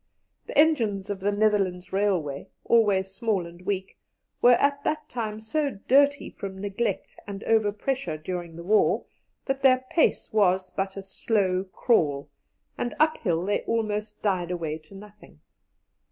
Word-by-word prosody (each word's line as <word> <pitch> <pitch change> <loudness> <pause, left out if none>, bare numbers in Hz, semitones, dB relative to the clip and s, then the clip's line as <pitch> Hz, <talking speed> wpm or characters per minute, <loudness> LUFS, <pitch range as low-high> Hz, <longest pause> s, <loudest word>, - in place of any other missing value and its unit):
The - - -5
engines 225 -11 +3
of 200 - -4
the 200 +2 0
Netherlands 200 -4 0
Railway, 180 -9 0 0.2
always 200 -5 +3
small 210 -5 -1
and 170 +1 -12
weak, 190 0 -4 0.4
were 245 - +7
at 280 +3 +2
that 305 -1 -2
time 220 -3 -4
so 275 +2 -2
dirty 280 +2 +4
from 195 -1 -7
neglect 205 +4 -3
and 200 0 -6
overpressure 215 - 0
during 170 +1 -5
the 170 - -8
war, 210 +4 +3 0.4
that 270 0 -2
their 255 -1 +4
pace 325 - +1
was 190 -3 +2
but 195 0 -3
a 195 - -5
slow 190 -1 0
crawl, 145 - +1 0.5
and 240 - -2
uphill 190 - +1
they 205 - 0
almost 210 -2 -2
died 185 -4 0
away 165 -3 -3
to 155 +5 -17
nothing. 210 +1 -14
205 Hz, 145 wpm, -26 LUFS, 185-230 Hz, 0.5 s, were